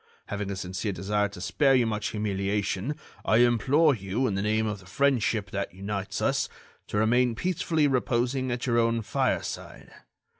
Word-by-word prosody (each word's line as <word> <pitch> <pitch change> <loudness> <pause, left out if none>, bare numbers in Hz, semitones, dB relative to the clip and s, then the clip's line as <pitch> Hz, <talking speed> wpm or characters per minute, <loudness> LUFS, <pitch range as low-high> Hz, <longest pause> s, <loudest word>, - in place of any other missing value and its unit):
"Having 105 -1 -3
a 100 - -3
sincere 95 +2 -3
desire 105 +2 0
to 100 - -11
spare 135 - +3
you 120 -3 +3
such 105 -1 -2
humiliation, 100 +4 -1 0.3
I 110 - +3
implore 130 +6 +4
you, 105 +3 -2
in 110 - 0
the 100 - -1
name 110 +1 +1
of 105 -2 -3
the 95 - -16
friendship 115 -4 +1
that 100 -2 -3
unites 100 0 -4
us, - - +1 0.4
to - - -3
remain 120 +2 +3
peacefully 160 0 0
reposing 130 0 0
at 120 0 -2
your 120 -2 +2
own 115 0 +1
fireside. - - -2
110 Hz, 165 wpm, -27 LUFS, 100-125 Hz, 0.4 s, implore